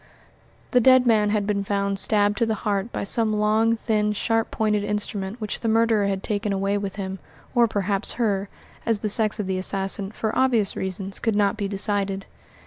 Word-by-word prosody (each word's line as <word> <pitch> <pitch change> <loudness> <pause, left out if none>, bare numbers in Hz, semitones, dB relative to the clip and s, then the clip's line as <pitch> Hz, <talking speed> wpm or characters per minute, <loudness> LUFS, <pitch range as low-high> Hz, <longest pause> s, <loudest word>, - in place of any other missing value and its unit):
The 250 - +4
dead 255 +1 +5
man 215 -3 +3
had 205 -1 0
been 200 -1 -1
found 200 0 -1
stabbed 205 0 +2
to 230 - +1
the 220 - 0
heart 205 +2 -1
by - - -4
some 215 +1 +3
long, 215 +2 +2
thin, 210 -2 0
sharp 225 +2 -1
pointed 210 -2 0
instrument 210 0 -3
which 215 -2 -4
the 230 - -3
murderer 225 -2 +2
had 195 -1 -3
taken 205 -1 -2
away 195 +1 -1
with 200 -1 -5
him 190 -1 -5 0.3
or 240 -2 +4
perhaps 200 -2 -1
her, 205 -4 -1 0.3
as 225 -3 0
the 215 - -2
sex 215 +1 +4
of 210 - -2
the 185 0 -2
assassin, 195 +1 +1
for 220 0 -3
obvious 240 -6 +1
reasons, 190 +1 -4
could 225 -2 -1
not 205 0 +2
be 205 -2 -3
decided. 195 -1 +1
210 Hz, 195 wpm, -23 LUFS, 195-220 Hz, 0.3 s, dead